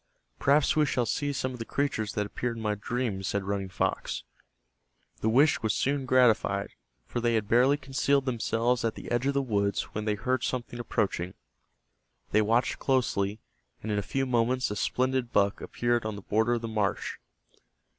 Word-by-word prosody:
"Perhaps 140 +1 +3
we 155 -1 +3
shall 125 -2 +1
see 145 +6 -1
some 130 -2 -2
of 125 - -9
the - - -2
creatures 115 -5 -1
that 105 - -1
appeared 115 +3 -3
in 110 - -6
my 105 -1 +1
dream," 110 -1 -2
said 100 +1 -1
Running 100 -1 -2
Fox. 90 - -2 1.0
The 110 - +1
wish 140 +6 +4
was 110 -2 0
soon 140 -1 0
gratified, 110 -6 +3 0.3
for 120 - -3
they 120 -1 +2
had 110 -2 0
barely 125 +6 +4
concealed 140 0 +1
themselves 120 0 0
at 115 -1 0
the - - -8
edge 120 +3 +1
of 140 - +1
the 140 - +2
woods 100 -5 0
when 105 0 -3
they 105 -1 +1
heard 130 +4 -1
something 120 -1 -3
approaching. 95 -6 -1 1.0
They 110 - +4
watched 115 +4 +1
closely, 110 -6 0 0.4
and 110 - -3
in 105 - +1
a - - 0
few 135 +6 -1
moments 125 0 +1
a - - -2
splendid 130 +2 0
buck 100 -2 +2
appeared 120 -1 0
on 110 -1 -3
the 100 - -9
border 110 +4 +2
of 120 - -1
the - - -2
marsh. 105 -3 -1
115 Hz, 185 wpm, -28 LUFS, 105-130 Hz, 1.0 s, wish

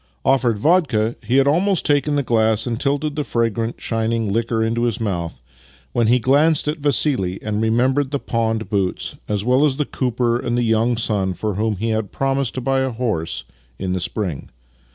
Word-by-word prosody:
Offered 125 -5 +2
vodka, 125 - +2
he 125 - +1
had 135 0 +4
almost 180 +5 +2
taken 145 0 +2
the 145 - +1
glass 110 -2 +2
and 120 -1 -3
tilted 145 +2 -1
the 150 - -1
fragrant, 115 -2 -1
shining 115 -2 -1
liquor 115 0 0
into 115 +1 -1
his 115 -3 -1
mouth, 85 - -3 0.5
when 120 -2 +2
he 120 +3 +5
glanced 145 +6 +3
at 150 +2 -1
Vassili 140 -10 +1
and 105 0 -2
remembered 130 +5 +1
the 140 - -1
pawned 115 -3 -2
boots, 100 -4 -2
as 105 0 -1
well 130 +3 +3
as 140 -3 +2
the 150 - 0
cooper 120 -2 -1
and 120 -1 -2
the 120 - +1
young 115 +1 +2
son 100 -5 0
for 105 +2 -2
whom 110 +2 -1
he 110 +4 -2
had 110 -2 -2
promised 135 -2 -1
to 130 - -2
buy 135 +1 +1
a 130 0 0
horse 110 -9 -2 0.3
in 95 -1 -3
the 95 - -1
spring. 90 -5 -3
115 Hz, 195 wpm, -20 LUFS, 110-135 Hz, 0.5 s, he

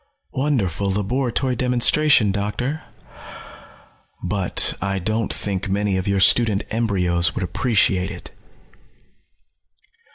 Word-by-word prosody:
"Wonderful 110 - -1
laboratory 125 +6 -1
demonstration, 125 -1 +3
Doctor. 105 +9 -3 1.4
But 90 0 0
I 100 0 -2
don't 110 +4 -2
think 100 -1 -4
many 100 0 0
of 95 +1 -3
your 100 -1 +1
student 105 +1 +4
embryos 90 -6 0
would 105 - -2
appreciate 95 -1 +1
it." 90 -4 -10
105 Hz, 95 wpm, -21 LUFS, 95-120 Hz, 1.4 s, student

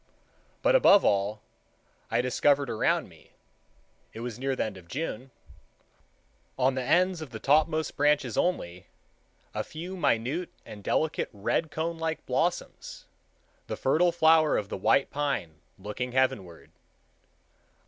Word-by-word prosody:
But, - - +4
above 205 - +6
all, 100 +2 +1 0.7
I - - +2
discovered 140 +2 +2
around 110 - +1
me,—it - - -20
was 120 0 -6
near 135 0 -1
the - - 0
end 110 -2 -5
of 90 -2 -13
June,—on 125 - -6
the 130 - -2
ends 180 +5 +2
of 155 - -7
the 110 -2 -8
topmost 155 +3 +2
branches 145 -5 +2
only, 90 - -1 0.7
a - - -2
few 175 +4 -7
minute 150 +2 0 0.2
and 105 -1 -10
delicate 155 +8 0
red 105 +10 -1
conelike 160 +1 -3
blossoms, 160 +8 -2 0.6
the - - -4
fertile 165 +6 +3
flower 160 -2 +4
of 100 -1 -3
the - - -4
white 135 +8 +2
pine 125 - -3 0.2
looking 105 +6 -5
heavenward. 100 -10 -1
135 Hz, 125 wpm, -28 LUFS, 110-160 Hz, 0.7 s, above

